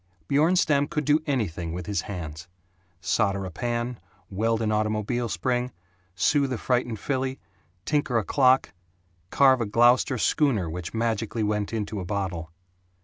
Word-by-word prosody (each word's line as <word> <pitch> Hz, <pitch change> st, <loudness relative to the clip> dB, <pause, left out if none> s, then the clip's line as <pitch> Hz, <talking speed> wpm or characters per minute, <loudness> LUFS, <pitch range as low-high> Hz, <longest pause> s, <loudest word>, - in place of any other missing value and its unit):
Bjornstam 150 Hz, -1 st, +3 dB
could 150 Hz, -3 st, -2 dB
do 150 Hz, +2 st, +3 dB
anything 90 Hz, -, -2 dB
with 90 Hz, 0 st, -5 dB
his 100 Hz, -3 st, -1 dB
hands 85 Hz, -4 st, -7 dB, 0.5 s
solder 100 Hz, -3 st, 0 dB
a 95 Hz, -, -6 dB
pan, 120 Hz, +4 st, -3 dB, 0.3 s
weld 115 Hz, +3 st, 0 dB
an 110 Hz, -, 0 dB
automobile 110 Hz, +2 st, -1 dB
spring, 125 Hz, +8 st, -1 dB, 0.4 s
soothe 140 Hz, +6 st, +2 dB
a 125 Hz, -, -1 dB
frightened 120 Hz, -2 st, -1 dB
filly, 130 Hz, -1 st, -2 dB, 0.5 s
tinker 145 Hz, -5 st, +1 dB
a 110 Hz, -, +1 dB
clock, 130 Hz, +3 st, +3 dB, 0.6 s
carve 130 Hz, -2 st, +4 dB
a -, -, +1 dB
Gloucester 120 Hz, +4 st, +4 dB
schooner 115 Hz, -, +1 dB
which 90 Hz, +5 st, -6 dB
magically 115 Hz, -1 st, -1 dB
went 105 Hz, -1 st, -1 dB
into 105 Hz, -2 st, -3 dB
a 90 Hz, -, -5 dB
bottle. 90 Hz, -4 st, -3 dB
115 Hz, 145 wpm, -26 LUFS, 100-130 Hz, 0.6 s, carve